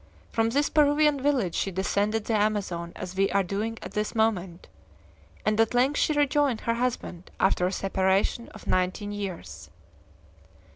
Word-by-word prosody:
From 225 0 +1
this 285 +5 +1
Peruvian 295 -1 +3
village 260 - +1
she 195 - -1
descended 205 +3 0
the 230 - -1
Amazon, 205 -5 0
as 185 0 -7
we 195 +1 +2
are 200 0 +2
doing 210 +5 -3
at - - -7
this 210 +1 -2
moment, 190 -6 0 0.8
and 215 +1 +3
at 225 +2 +1
length 265 +4 +3
she - - +2
rejoined 290 -4 +2
her 230 - 0
husband 230 -7 -3
after 180 -1 +2
a - - -2
separation 195 +4 0
of - - -13
nineteen 185 +3 0
years." 165 - -6
210 Hz, 155 wpm, -27 LUFS, 190-240 Hz, 0.8 s, Peruvian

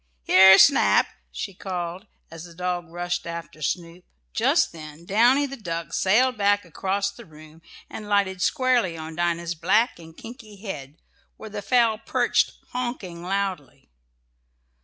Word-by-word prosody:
Here, 190 - +8
Snap!" 280 +6 +5 0.2
she 195 - -6
called, 180 +1 -5 0.2
as 165 +1 -9
the 170 -1 -14
dog 180 -1 -3
rushed 175 +1 -4
on 170 - -4
after 165 -2 -9
Snoop. 170 +4 -4 0.3
Just - - +2
then 155 0 -11
Downy, 240 +9 +3
the 275 -1 -6
duck, 170 -8 -6
sailed 240 +5 +2
back 205 -1 +2
across 195 +4 -2
the - - -13
room, 155 0 -16 0.3
and 210 -1 -9
lighted 195 -2 +1
squarely 245 - +1
on 160 0 -8
Dinah's 170 0 -1
black 190 +7 +1
and 160 -1 -14
kinky 225 -3 -11
head, 160 -8 -8 0.4
where 220 - -10
the 205 0 -5
fowl 230 -1 +2
perched - - +1 0.2
"honking" 240 -9 -5
loudly. 185 - -4
185 Hz, 145 wpm, -24 LUFS, 170-215 Hz, 0.4 s, Here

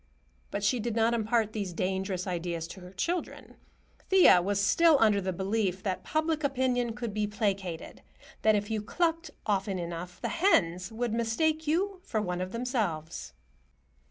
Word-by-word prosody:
But 200 - -3
she 240 +4 +2
did 230 0 -2
not 230 +1 +3
impart 225 -1 +1
these 200 -5 -3
dangerous 190 +1 -2
ideas 170 -2 -3
to 190 - -9
her 180 0 -11
children. 335 - -3 0.5
Thea 370 - +7
was 200 +2 0
still 315 - +5
under 210 -4 +4
the 190 0 -1
belief 190 0 -1
that 190 -3 -2
public 315 0 0
opinion 255 -4 +1
could 235 -4 -4
be 210 0 0
placated; 195 -5 -3 0.4
that 215 -1 +4
if 205 +1 -2
you 220 -1 0
clucked 330 +8 -1 0.2
often 195 -2 0
enough, 175 +1 -6
the - - -2
hens 185 - +2
would 230 0 -2
mistake 305 +8 0
you 375 +5 0
for 225 -11 -2
one 180 -3 -2
of 185 0 -4
themselves. 200 - -3
210 Hz, 160 wpm, -29 LUFS, 185-245 Hz, 0.5 s, Thea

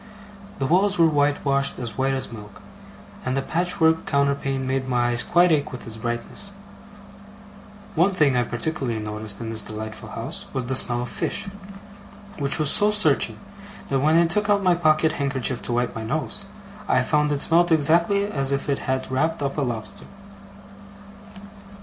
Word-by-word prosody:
The 135 - -1
walls 195 +7 +3
were 165 - +5
whitewashed 145 -2 +1
as 115 -4 -5
white 135 0 0
as 130 -2 -2
milk, 105 -2 -11 0.6
and 130 +1 -1
the - - +1
patchwork 165 0 +1
counterpane 140 -1 0
made 130 0 -1
my 120 -1 +1
eyes 120 0 +2
quite 175 0 +4
ache 150 -3 +1
with 125 - -8
its 115 - -5
brightness. 120 - -4 1.4
One 175 +5 +3
thing 145 -6 +3
I 125 - +3
particularly 120 0 -2
noticed 105 -1 -5
in 115 -1 -5
this 110 -1 +2
delightful 110 +1 -7
house, - - -6
was 130 -2 -2
the 130 +2 -2
smell 120 -1 +1
of 120 - -6
fish; 200 0 -3 0.9
which 140 0 +3
was 155 -2 +4
so 210 0 +5
searching, 155 - +2 0.5
that 135 - +1
when 155 +4 +3
I 170 - +5
took 205 +5 -1
out 200 -1 +3
my 180 -1 +4
pocket 155 -2 +3
handkerchief 135 -4 -2
to - - -5
wipe 120 +1 0
my 115 - -5
nose, 155 - -3 0.4
I - - +3
found 150 -1 +1
it 145 -1 0
smelt 175 +1 +3
exactly 170 +6 +3
as 140 -9 -1
if 140 +1 -2
it 140 - 0
had 130 0 -1
wrapped 145 +3 0
up 140 0 -2
a 150 - -1
lobster. 120 -5 -5
140 Hz, 175 wpm, -23 LUFS, 125-160 Hz, 1.4 s, were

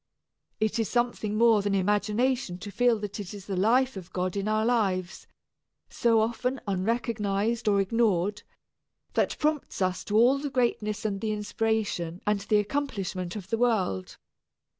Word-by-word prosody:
It 215 +1 0
is 225 - 0
something 240 -3 0
more 225 -2 +5
than 200 0 0
imagination 210 +2 +1
to 205 - -7
feel 240 +1 +3
that 210 0 -5
it 205 0 -6
is 195 -2 -10
the 195 - -3
life 245 +7 +3
of 185 -2 -9
God 185 0 -2
in 200 +1 -2
our 215 0 +1
lives, 195 -7 0 0.6
so 230 -2 +3
often 250 +4 -1
unrecognized 215 +2 -1
or 200 -1 +4
ignored, 205 -1 +1 0.7
that - - +1
prompts 305 -1 -1
us 185 -1 0
to 210 - +1
all 250 +5 +5
the 285 0 -3
greatness 220 -5 -1
and 195 -2 -1
the 220 - -1
inspiration 210 -5 -1
and 210 -1 +2
the 205 +1 +1
accomplishment 205 -6 -2
of 195 -2 -8
the 225 - 0
world. 190 - 0
210 Hz, 160 wpm, -27 LUFS, 195-235 Hz, 0.7 s, more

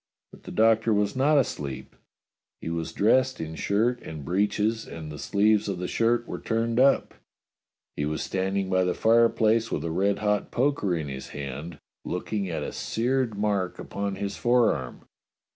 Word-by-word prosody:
But - - -17
the - - -7
Doctor 110 0 +3
was 105 +2 0
not 145 +3 +3
asleep. 70 - -2 0.6
He 80 - -5
was 80 -1 -3
dressed 130 +8 +2
in 80 0 -5
shirt 110 +8 0
and 75 -3 -8
breeches, 105 +5 0
and 80 -2 -8
the 75 - -8
sleeves 105 +1 +2
of 95 - -2
the 90 0 -3
shirt 120 +1 +1
were - - -5
turned 115 +1 0
up. 135 +1 +3 0.8
He 75 - -1
was 75 +1 -2
stand 95 +1 -1
ing 100 -1 0
by 95 0 +2
the 90 -1 0
fireplace 115 0 +3
with 75 - -2
a 80 - -2
red 100 +4 +1
hot 105 -1 0
poker 125 -8 +1
in 80 -3 -3
his 65 -1 -6
hand, 70 +3 -6 0.3
looking 95 +2 -3
at 80 - -3
a - - -4
seared 120 -1 -1
mark 100 -3 0
upon 100 -1 -4
his 100 0 -4
forearm. 115 - +1
100 Hz, 175 wpm, -26 LUFS, 85-115 Hz, 0.8 s, Doctor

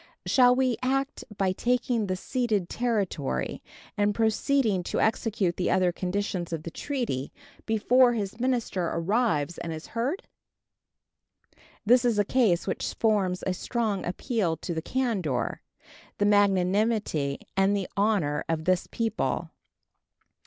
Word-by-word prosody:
Shall 250 -1 +5
we 255 -2 +1
act 270 +2 -1
by 195 -2 +2
taking 240 +1 0
the 185 - -1
ceded 215 -3 -1
territory 195 - -1 0.3
and 205 0 +1
proceeding 225 -1 +2
to - - -2
execute 220 -5 0
the 180 - 0
other 185 -1 +3
conditions 185 -1 -3
of 160 -2 -3
the 170 - -6
treaty 235 - -3 0.4
before 240 +3 +4
this 205 +1 -4
minister 235 -8 0
arrives 175 - 0
and 170 - -4
is 160 0 -6
heard? 260 - -1 1.6
This 245 +3 +5
is 235 -3 +2
a 205 - +3
case 210 -8 +2
which 190 - -3
forms 200 -5 +1
a 190 - 0
strong 215 0 -2
appeal 185 -2 -1
to 170 - -4
the 160 - -2
candor, 195 - -1 0.6
the 205 - +2
magnanimity, 200 -6 +2
and 195 +1 +3
the 195 - -3
honor 195 -8 +1
of 160 -1 -1
this 185 -1 +1
people. 230 -1 -2
205 Hz, 130 wpm, -27 LUFS, 180-235 Hz, 1.6 s, Shall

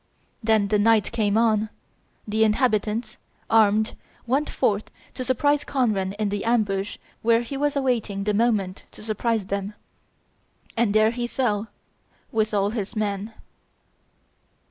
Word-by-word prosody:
Then, 220 -2 +3
when 210 0 +2
night 225 -1 +3
came 215 -3 +1
on, 220 -2 +2 0.6
the 220 +1 +2
inhabitants, 215 0 +1 0.3
armed, 220 -1 +4 0.3
went 270 +5 +1
forth 215 -5 0 0.2
to 255 - -4
surprise 285 +3 +2
Conran 210 -8 0
in 210 0 -1
the 200 0 -2
ambush 205 -4 0 0.2
where 230 +1 +3
he 255 +4 -6
was 290 +1 0
awaiting 235 -7 0
the 210 +1 0
moment 205 -4 0
to - - -11
surprise 220 0 -1
them. 200 +1 -3 1.0
And 225 -3 +1
there 215 +1 +5
he 240 0 -3
fell 225 -4 -1 0.6
with 220 -1 +1
all 200 -1 +1
his 215 -1 -4
men. 210 0 -2
215 Hz, 135 wpm, -24 LUFS, 205-235 Hz, 1.0 s, there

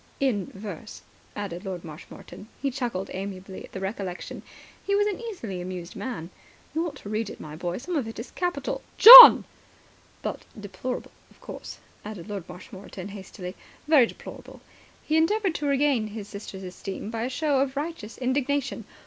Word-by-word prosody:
"In 225 -9 0
verse," 200 0 -10 0.3
added 190 -3 -6
Lord 185 -4 -6
Marshmoreton. 160 +5 -12
He 275 - -2
chuckled 235 -7 -4
amiably 190 0 -7
at - - -13
the 190 - -7
recollection. 190 -2 -6 0.4
He 400 - 0
was 410 0 +2
an 415 -2 -2
easily 235 - -6
amused 180 -1 -7
man. 180 -10 -6 0.4
"You 325 +2 -1
ought 295 - -8
to 205 - -11
read 215 0 -2
it, - - -10
my 150 0 -9
boy. 175 +2 -4
Some 345 +8 -5
of 270 -7 -1
it 225 - -9
was 230 - -8
capital.. 350 -6 -3
." - - -32
"John!" - - +13 0.8
"But - - -4 0.2
deplorable, 205 +5 -6 0.2
of - - -24
course," - - -9 0.3
added 210 -2 -9
Lord 200 -4 -6
Marshmoreton 190 +1 -10
hastily. 190 -2 -9 0.3
"Very 290 -6 +5
deplorable." - - -12 0.4
He 310 - 0
endeavoured 385 +3 +1
to 295 -2 -3
regain 275 -5 +1
his 210 -1 -8
sister's 200 -2 -9
esteem 190 +3 -7
by 225 -1 -4
a 245 - -2
show 285 +1 0
of 270 0 -1
righteous 290 -8 -6
indignation. 265 -2 -2
220 Hz, 170 wpm, -25 LUFS, 190-280 Hz, 0.8 s, John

